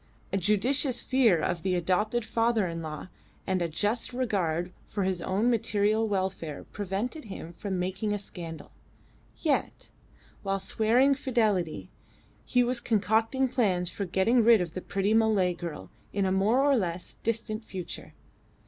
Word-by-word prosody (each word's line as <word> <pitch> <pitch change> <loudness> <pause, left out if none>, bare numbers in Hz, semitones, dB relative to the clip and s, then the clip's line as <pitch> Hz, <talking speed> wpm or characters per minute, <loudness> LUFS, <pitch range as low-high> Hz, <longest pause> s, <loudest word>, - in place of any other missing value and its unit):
A - - +3
judicious 240 - +2
fear 240 -10 +3
of 170 +2 -1
the 185 0 0
adopted 210 +7 0
father 230 -2 +1
in 165 -1 -4
law 155 +2 -6 0.4
and 185 -1 0
a 170 - +1
just 210 +10 0
regard 180 -8 -1
for 200 - -2
his 185 -2 -1
own 205 +8 +1
material 215 -1 +2
welfare 190 -6 -2
prevented 210 - -3
him 175 -4 -8
from 190 +1 -4
making 190 +4 -2
a 205 - 0
scandal; 170 -5 -8 0.7
yet, 305 -4 -1 0.5
while 195 -1 -1
swearing 230 +7 +3
fidelity, 215 - 0 0.5
he 250 -1 +2
was 245 0 0
concocting 225 +4 +1
plans 185 -8 0
for 200 - -3
getting 210 +7 +3
rid 230 -1 +7
of 175 -3 -3
the 185 - -4
pretty 195 +4 0
Malay 215 -5 +3
girl 165 - -7 0.2
in 200 -1 0
a 190 - +1
more 210 +8 +3
or 285 -1 +4
less 180 -6 -2
distant 225 -1 -2
future. 185 -5 -8
205 Hz, 150 wpm, -28 LUFS, 180-230 Hz, 0.7 s, rid